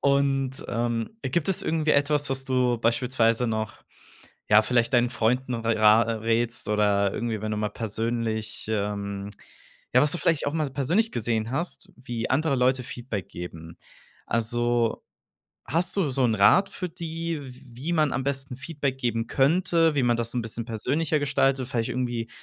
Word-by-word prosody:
Und, 135 -1 +1
ähm, 115 -1 -1
gibt 170 0 -1
es 190 - +1
irgendwie 155 -1 0
etwas, 145 0 +2
was 135 0 0
du 125 -2 +1
beispielsweise 115 0 +1
noch, 110 -1 -2 0.8
ja, 105 0 +7
vielleicht 120 +2 +1
deinen 120 0 +4
Freunden 125 +2 0
ra 115 -1 +4
äh, 115 - -2
rätst 115 +1 -1
oder 100 -2 +2
irgendwie, 115 -3 -3
wenn 110 0 -3
du 105 - -2
mal 105 0 -1
persönlich, 110 0 -3
ähm 100 -1 -2 0.7
ja, 125 - +7
was 150 - +3
du 175 - 0
vielleicht 165 -3 +1
auch 145 - -1
mal 155 -2 0
so 135 - -11
persönlich 175 - +1
gesehen 115 -1 -1
hast, 170 +7 -4
wie 120 -2 -5
andere 145 +1 +2
Leute 125 +1 +2
Feedback 120 -5 -6
geben? 85 -1 -9 0.5
Also, 120 0 0 0.6
hast 170 +6 0
du 180 -8 +1
so 130 0 +1
'n 115 -2 +2
Rat 180 - +5
für 180 -2 -5
die, 165 -1 -4
w 130 -2 -11
wie 130 +8 -5
man 155 -3 +2
am 135 - -1
besten 135 -2 -3
Feedback 140 -1 -3
geben 115 -3 -1
könnte, 165 +2 +3
wie 135 - +2
man 120 -1 +2
das 115 0 -2
so 125 - -3
'n - - +1
bisschen 115 0 -4
persönlicher 140 +8 0
gestaltet? 135 -2 +1
Vielleicht 120 -2 -1
irgendwie 120 -2 -2
125 Hz, 175 wpm, -26 LUFS, 115-140 Hz, 0.8 s, ja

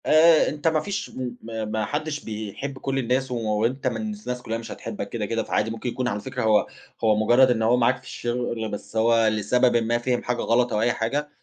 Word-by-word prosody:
آآ 160 +1 +6
أنت 150 +1 -3
ما 160 -1 +3
فيش 200 +6 -4
م 125 -2 -5
ما 110 -1 -4
ما 110 0 -2
حدّش 150 +5 -3
بيحب 110 +6 -5
كل 135 0 -2
الناس 130 +1 0
وأنت 115 +3 0
من 120 -3 -1
الناس 110 +3 -4
كُلّها 115 -1 -3
مش 115 -1 -8
هتحبك - - -6
كده، - - -3
كده - - -1
فعادي 110 +1 0
ممكن 115 +2 -4
يكون 125 +1 -2
على 105 -4 -1
فكرة 130 +3 -4
هو 105 -2 +3 0.4
هو 110 -1 +4
مُجرّد 120 +4 +5
إن 115 -2 0
هو 115 +3 +4
معاك 125 +2 +3
في - - -20
الشغل 120 -2 -3
بس 105 - -7
هو 115 0 +4
لسببٍ 110 +4 +2
ما 115 +1 +1
فِهِم 120 +1 -1
حاجة 120 -1 -1
غلط 120 0 +2
أو 105 - +1
أي 120 +1 +3
حاجة 140 +7 -2
120 Hz, 220 wpm, -24 LUFS, 110-130 Hz, 0.4 s, آآ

